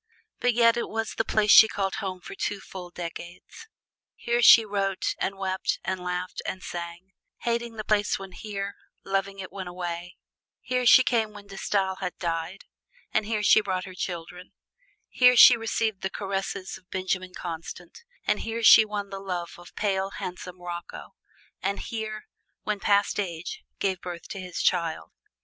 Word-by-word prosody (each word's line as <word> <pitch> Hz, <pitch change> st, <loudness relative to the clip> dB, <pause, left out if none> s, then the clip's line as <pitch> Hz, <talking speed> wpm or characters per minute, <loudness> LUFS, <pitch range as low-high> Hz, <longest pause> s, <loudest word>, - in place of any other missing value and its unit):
But 245 Hz, -2 st, +2 dB
yet 230 Hz, -1 st, +5 dB
it 235 Hz, -, -2 dB
was 225 Hz, 0 st, -3 dB
the 225 Hz, -, 0 dB
place 210 Hz, -2 st, +2 dB
she 220 Hz, -, +10 dB
called 195 Hz, -3 st, -2 dB
home 190 Hz, -4 st, -4 dB
for -, -, -9 dB
full 190 Hz, -3 st, -5 dB
two 175 Hz, -, -34 dB
decades. 175 Hz, -, -9 dB, 0.5 s
Here 240 Hz, 0 st, 0 dB
she 230 Hz, -1 st, +9 dB
wrote 195 Hz, -2 st, -1 dB
and 195 Hz, +1 st, -2 dB
wept 190 Hz, -1 st, -1 dB
and 190 Hz, 0 st, -2 dB
laughed 180 Hz, 0 st, -4 dB
and 185 Hz, -, -5 dB
sang: 175 Hz, +2 st, -7 dB, 0.3 s
hating 235 Hz, -1 st, -2 dB
the 215 Hz, -, -5 dB
place 205 Hz, -1 st, +1 dB
when 195 Hz, -1 st, -9 dB
here, 200 Hz, 0 st, -5 dB, 0.3 s
loving 195 Hz, 0 st, -1 dB
it 190 Hz, -1 st, -7 dB
when 190 Hz, -2 st, -6 dB
away. 175 Hz, 0 st, -5 dB, 0.4 s
Here 250 Hz, -1 st, -1 dB
she 255 Hz, -, +9 dB
came 225 Hz, -4 st, +1 dB
when 205 Hz, -1 st, -11 dB
De 195 Hz, -1 st, -11 dB
Stael 190 Hz, -1 st, 0 dB
had 180 Hz, -2 st, -4 dB
died, 170 Hz, +2 st, -3 dB, 0.5 s
and 210 Hz, -, +1 dB
here 215 Hz, -2 st, -1 dB
she 215 Hz, -, +6 dB
brought 185 Hz, -3 st, -2 dB
her 185 Hz, -, -9 dB
children. 180 Hz, 0 st, -6 dB, 0.5 s
Here 250 Hz, 0 st, +5 dB
she 245 Hz, 0 st, +10 dB
received 225 Hz, -2 st, -1 dB
the 190 Hz, -, -1 dB
caresses 195 Hz, -1 st, -4 dB
of 185 Hz, -, -34 dB
Benjamin 185 Hz, -1 st, -2 dB
Constant, 170 Hz, -, -7 dB, 0.2 s
and -, -, +1 dB
here 225 Hz, +1 st, -4 dB
she 220 Hz, -, +9 dB
won 205 Hz, -2 st, -5 dB
the 195 Hz, -, -5 dB
love 180 Hz, -3 st, -4 dB
of 175 Hz, -, -15 dB
pale, 195 Hz, -2 st, 0 dB
handsome 180 Hz, -1 st, -7 dB
Rocco, 175 Hz, -1 st, -7 dB, 0.5 s
and 200 Hz, +1 st, -1 dB
here, 215 Hz, -1 st, -5 dB, 0.4 s
"when 210 Hz, -1 st, -2 dB
past 200 Hz, +1 st, +2 dB
age," 175 Hz, -3 st, -4 dB, 0.2 s
gave 190 Hz, -2 st, -1 dB
birth 175 Hz, -2 st, -7 dB
to 195 Hz, -, -6 dB
his 180 Hz, -2 st, -4 dB
child. 170 Hz, -3 st, 0 dB
195 Hz, 170 wpm, -26 LUFS, 180-215 Hz, 0.5 s, she